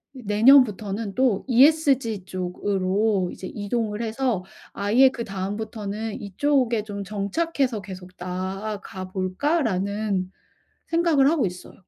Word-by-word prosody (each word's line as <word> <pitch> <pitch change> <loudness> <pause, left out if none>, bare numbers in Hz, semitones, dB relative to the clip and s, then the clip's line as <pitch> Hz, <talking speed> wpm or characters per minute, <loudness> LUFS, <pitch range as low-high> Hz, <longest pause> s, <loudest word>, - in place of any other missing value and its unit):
이제 255 - -10
내년부터는 210 -3 +4
또 250 -6 +2
ESG 260 - +3
쪽으로 190 +1 -1
이제 185 - -8
이동을 210 +1 -3
해서 225 -3 -1 0.3
아예 230 +7 +4
그다음부터는 215 0 -5
'이쪽에 235 +2 +1
좀 200 -2 -6
정착해서 220 - -1
계속 185 -1 -10
나아가 190 +1 -5
볼까?'라는 200 - -1 0.6
생각을 330 -4 +3
하고 305 -10 +2
있어요. 180 0 -8
210 Hz, 275 characters per minute, -24 LUFS, 195-255 Hz, 0.6 s, 내년부터는